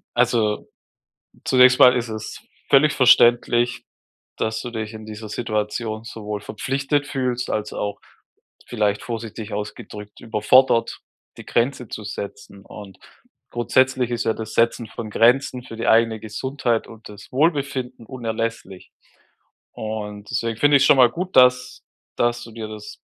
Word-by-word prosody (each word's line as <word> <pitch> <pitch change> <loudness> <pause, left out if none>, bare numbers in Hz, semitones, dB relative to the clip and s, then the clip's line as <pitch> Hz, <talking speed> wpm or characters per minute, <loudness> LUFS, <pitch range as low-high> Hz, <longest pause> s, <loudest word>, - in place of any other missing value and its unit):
Also, 115 -3 +1 0.8
zunächst 125 0 +5
mal 125 0 +8
ist 120 -2 -2
es 110 -1 -7 0.3
völlig 150 +2 +5
verständlich, 120 -1 +4 0.5
dass 110 0 -2
du 120 - -7
dich 110 -1 -5
in 110 0 -9
dieser 110 0 -8
Situation 110 0 -3
sowohl 105 -2 -6
verpflichtet 140 +7 -2
fühlst, 125 -2 -2
als 105 -1 -2
auch- 105 0 -4 0.7
vielleicht 105 -3 -1
vorsichtig 115 -2 -6
ausgedrückt- 105 0 -7
überfordert, 115 +2 +2 0.4
die - - -12
Grenze 125 0 -1
zu 110 - -7
setzen. 100 -1 -8
Und 100 -3 -12 0.5
grundsätzlich 130 +1 +1
ist 120 0 -2
ja 110 - +2
das 110 -1 -7
Setzen 115 0 +1
von 110 0 -8
Grenzen 125 +3 +2
für 115 - -10
die 115 - -3
eigene 115 -1 +3
Gesundheit 120 +2 -2
und 115 -1 -13
das 105 0 -13
Wohlbefinden 135 -4 -1
unerlässlich. 115 -5 -5 0.8
Und 105 0 -6
deswegen 115 -1 -2
finde 145 0 +5
ich 135 - +4
es 140 - +4
schon - - +6
mal 125 -2 +7
gut, 180 +8 -5
dass 125 0 +4 0.3
dass 120 0 0
du 115 - -12
dir 110 -1 -7
das 105 -1 -10
115 Hz, 145 wpm, -22 LUFS, 110-125 Hz, 0.8 s, mal